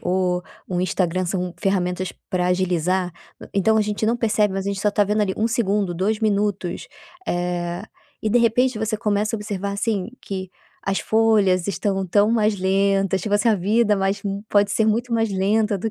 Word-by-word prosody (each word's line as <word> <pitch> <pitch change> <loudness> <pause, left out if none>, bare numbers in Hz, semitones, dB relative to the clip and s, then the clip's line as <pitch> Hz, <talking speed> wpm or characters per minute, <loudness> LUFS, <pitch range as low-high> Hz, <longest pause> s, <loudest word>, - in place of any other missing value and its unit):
o 180 0 0 0.3
um 180 -1 0
Instagram 185 0 0
são 180 0 -2
ferramentas 185 -1 -1 0.2
pra 180 -1 0
agilizar, 180 0 0 0.3
hã, - - -10
então 200 +3 +3
a - - +4
gente 210 +1 -2
não 230 +2 +2
percebe, 210 -4 +1
mas 195 0 -2
a - - -2
gente 200 -1 -2
só 210 +1 +1
tá 205 - +3
vendo 210 +1 +1
ali, 190 -2 -1
1 220 +2 +1
segundo, 205 -5 0
2 200 +5 -1
minutos, 205 -4 -1 0.4
eh, 175 0 -2 0.4
e 215 - 0
de 245 - +4
repente 240 +1 +2
você 220 0 -1
começa 210 0 0
a - - 0
observar, 200 -1 -4
assim, 205 0 -1
que 190 -1 -5 0.4
as 195 0 0
folhas 210 -5 +3
estão 195 -1 -1
tão 205 +4 +3
mais 215 -2 +2
lentas, 195 0 +1
tipo 205 +1 -1
assim, 205 +3 +3
a 220 - +4
vida 210 +3 +2
mais 195 +1 -1
mu 200 0 -4
pode 205 0 +3
ser 220 +2 +2
muito 235 +3 0
mais 225 -1 +2
lenta 205 +2 +1
do 220 +4 -3
200 Hz, 195 wpm, -22 LUFS, 185-215 Hz, 0.4 s, a